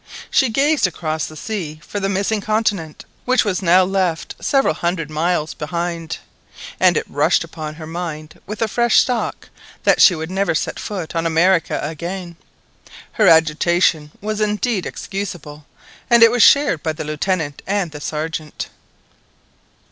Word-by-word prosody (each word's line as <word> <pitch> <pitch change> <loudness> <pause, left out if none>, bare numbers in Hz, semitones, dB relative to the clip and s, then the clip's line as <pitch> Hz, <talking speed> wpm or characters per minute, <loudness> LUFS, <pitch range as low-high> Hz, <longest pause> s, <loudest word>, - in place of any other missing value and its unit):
She 265 - +3
gazed 280 0 +2
across 160 -3 -3
the 155 - -11
sea 165 -6 -5
for 205 - -4
the 195 0 -1
missing 200 +2 0
continent, 205 -7 -1 0.2
which 255 -1 +3
was 200 -2 -1
now 185 +1 +5
left 185 -3 -1
several 275 -2 +2
hundred 170 -3 -2
miles 160 0 0
behind, 170 +1 -4 0.6
and - - +4
it - - -1
rushed - - +2
upon 155 -1 -7
her 160 0 -9
mind 160 -2 -6
with 210 +3 -3
a - - +1
fresh 240 +2 +3
shock 250 -2 -3 0.3
that - - +4
she 185 - +7
would 160 +2 -5
never 195 -2 0
set - - -2
foot 185 -6 -5
on 165 0 0
America 165 +2 +2
again. 170 +3 -5 0.8
Her - - +2
agitation 160 0 +3
was 215 +1 -3
indeed 210 -1 0
excusable, 165 -7 -6 0.4
and 235 -1 +7
it 230 - +7
was 245 -1 +1
shared 280 - +5
by 160 - -2
the 155 - -6
Lieutenant 155 0 -2
and 195 -4 -1
the 150 -1 -9
Sergeant. 155 0 -4
175 Hz, 155 wpm, -19 LUFS, 160-205 Hz, 0.8 s, she